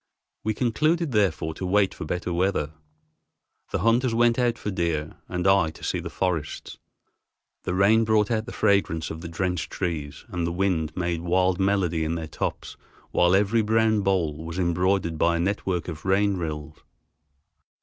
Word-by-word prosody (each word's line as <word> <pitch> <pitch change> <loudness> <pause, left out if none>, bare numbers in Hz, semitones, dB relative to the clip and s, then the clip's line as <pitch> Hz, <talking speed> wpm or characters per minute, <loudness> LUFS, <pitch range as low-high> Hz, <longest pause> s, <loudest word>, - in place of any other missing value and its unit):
We 110 0 -1
concluded 155 +7 +1
therefore 95 -7 +1
to 85 - -8
wait 95 +1 +2
for - - -7
better 90 +2 -3
weather. 85 -4 0 1.0
The - - -2
hunters 115 +3 +2
went 120 +1 +3
out 120 -1 +1
for 105 - -4
deer 85 -4 -2
and 90 0 -2
I 95 -4 +4
to 80 - -13
see - - -1
the - - -6
forests. 85 -5 -3 0.9
The 90 - -1
rain 105 +4 +4
brought 110 0 +2
out 110 0 -1
the - - -6
fragrance 80 -6 +1
of 80 - -7
the 85 - -6
drenched 90 +1 -2
trees, 75 -6 -4
and 90 -4 -2
the - - -1
wind 85 -4 -1
made 85 -2 -1
wild 90 +1 +1
melody 95 -4 +1
in 80 +1 -1
their 80 -1 -4
tops, 75 - -4 0.3
while 90 +1 +4
every 105 +3 +3
brown 110 0 +2
bole 85 -6 0
was 80 +1 -6
embroidered 90 -1 +1
by 85 0 +3
a - - -2
network 95 -1 -1
of 80 -2 -6
rain 100 +1 +2
rills. 75 -3 -5
90 Hz, 170 wpm, -25 LUFS, 85-105 Hz, 1.0 s, I